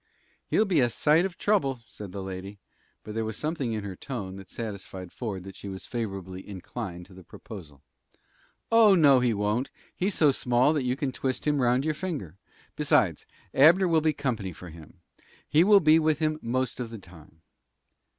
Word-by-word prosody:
"He'll 220 - +3
be 185 -6 +2
a 120 -2 +3
sight 155 +8 +3
of 190 -2 -5
trouble," 140 - +1
said 105 -4 -10
the 100 0 -6
lady; 95 +2 -7 0.5
but 105 - -8
there 115 +1 -1
was 110 -1 -4
something 150 -7 -2
in 105 -2 -3
her 100 -2 -6
tone 100 -5 -6
that 95 -2 -12
satisfied 95 -5 -7
Ford 100 -7 -5
that 95 0 -10
she 100 - -8
was 95 -1 -7
favorably 95 -5 -5
inclined 95 -2 -7
to 95 - -17
the 95 0 -13
proposal. 80 -7 -12 0.9
"Oh, 225 -3 +7
no, 145 -6 +6
he 125 -1 +2
won't. 105 +4 -1 0.3
He's 190 +2 -1
so 150 -3 +5
small 125 +2 +2
that 145 -4 -1
you 125 0 +1
can 135 -1 -2
twist 130 0 -3
him 145 -2 +2
round 125 +3 +2
your 155 - +1
finger. 145 - -5 0.4
Besides, - - +2 0.3
Abner 170 +7 +6
will 165 -2 +3
be 155 0 +2
company 120 - -3
for 90 +2 -11
him. 80 -2 -14 0.5
He 155 +3 +4
will 205 +1 +7
be 155 -2 +5
with 155 -1 +2
him 155 -1 -1
most 130 +2 -2
of 120 -2 -4
the 115 - -8
time." 80 -4 -17
120 Hz, 190 wpm, -27 LUFS, 95-150 Hz, 0.9 s, Oh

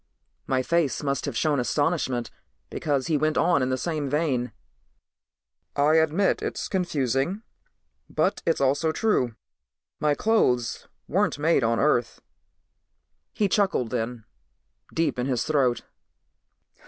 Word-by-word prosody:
My 130 -1 +1
face 165 -2 0
must 140 -1 -1
have 140 -5 -3
shown 150 -3 +1
astonishment 130 -2 0 0.4
because 140 -4 -1
he 155 - +1
went 155 +1 +1
on 170 -5 +3
in 130 - 0
the 130 - 0
same 155 -2 -2
vein. 135 -5 0 1.2
"I 150 +3 +4
admit 160 +5 +2
it's - - -3
confusing, 170 - -1 0.7
but - - 0
it's 165 - +1
also 140 +4 +2
true. 145 - 0 0.6
My 150 -1 +2
clothes 125 - +1 0.2
weren't - - +1
made 150 -2 +2
on 115 0 +1
Earth." 125 -4 +1 1.1
He 205 - +1
chuckled 190 - +1
then, 115 -2 -3 0.7
deep 160 -5 0
in 125 - -1
his 125 -3 0
throat. 135 -6 +1
145 Hz, 125 wpm, -25 LUFS, 125-160 Hz, 1.2 s, I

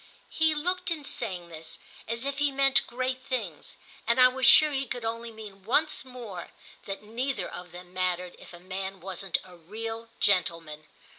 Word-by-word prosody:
He 315 -1 +3
looked, 360 +5 0
in 320 -3 -2
saying 180 -10 -3
this, 160 -1 -8 0.3
as 230 +3 -1
if 280 0 -2
he 290 -1 +3
meant 275 0 +4
great 255 +1 -2
things, 235 - -4 0.3
and 235 +2 +3
I 255 0 +9
was 260 0 +2
sure 305 -1 +9
he 270 -1 0
could 240 0 -4
only 230 +1 -3
mean 210 -3 -11
once 300 +9 +2
more 235 -9 -8 0.4
that 195 +1 -5
neither 245 +6 -2
of 180 0 -8
them 180 0 -11
mattered 180 -1 -1
if - - -12
a 175 - -10
man 190 +1 -5
wasn't 190 0 -1
a 180 -1 -14
real 225 +6 -6
gentleman. 165 -5 +2
225 Hz, 175 wpm, -28 LUFS, 180-260 Hz, 0.4 s, I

